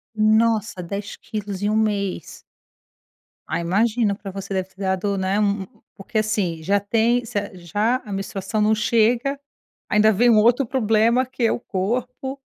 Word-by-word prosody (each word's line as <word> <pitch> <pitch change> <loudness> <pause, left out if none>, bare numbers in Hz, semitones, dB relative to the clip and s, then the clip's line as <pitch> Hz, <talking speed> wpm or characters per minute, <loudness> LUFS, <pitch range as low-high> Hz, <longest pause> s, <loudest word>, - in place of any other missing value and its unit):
Nossa, 215 -2 +2
10 200 +4 -5
quilos 205 -2 -6
em 205 - +1
1 215 - +1
mês. 200 -5 -1 1.1
Ai, 170 - -1
imagina! 210 +4 +1
Para 195 -1 -8
você, 195 +1 -7
deve 190 -1 -1
ter 190 - -30
dado, 190 +1 0
né, 190 +2 0
um 200 -1 +1
um - - -8 0.3
porque 215 +2 -3
assim, 200 -7 -1
já 200 +5 +2
tem 230 +4 +1
cer 205 -3 -3
já 205 +8 0
a 205 - -8
menstruação 195 +2 -3
não 215 +1 +4
chega, 235 +5 +1 0.5
ainda 215 +1 +4
vem 240 +5 +4
um 225 - +5
outro 240 +5 +4
problema 230 +1 +2
que 255 -1 -5
é 225 - +4
o - - -1
corpo. 250 +7 -3
210 Hz, 170 wpm, -22 LUFS, 195-230 Hz, 1.1 s, um